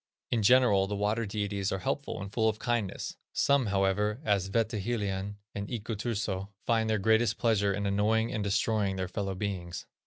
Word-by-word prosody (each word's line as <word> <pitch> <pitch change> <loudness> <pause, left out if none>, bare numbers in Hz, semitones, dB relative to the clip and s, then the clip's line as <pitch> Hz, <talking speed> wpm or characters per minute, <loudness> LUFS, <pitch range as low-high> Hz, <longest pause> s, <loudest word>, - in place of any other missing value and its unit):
In 115 - +2
general 105 -4 +5
the 105 - -2
water 105 +2 0
deities 100 -1 -2
are 95 - 0
helpful 140 +9 -3
and 100 0 -7
full 110 -1 +3
of 110 - -2
kindness; 120 -5 -2 0.2
some, 140 -4 +3
however, 100 +3 +1
as 100 -4 +1
Wetehilien 105 -2 -1 0.2
and 100 0 -4
Iku 115 -1 -4
Turso, 100 -3 -2 0.2
find 110 -1 +2
their 110 - +2
greatest 110 +3 +3
pleasure 105 -4 +2
in 100 +1 -2
annoying 110 +4 +1
and 110 -3 -1
destroying 100 0 +1
their 95 -1 -2
fellow 95 0 -3
beings. 90 -3 -4
105 Hz, 175 wpm, -30 LUFS, 100-110 Hz, 0.2 s, general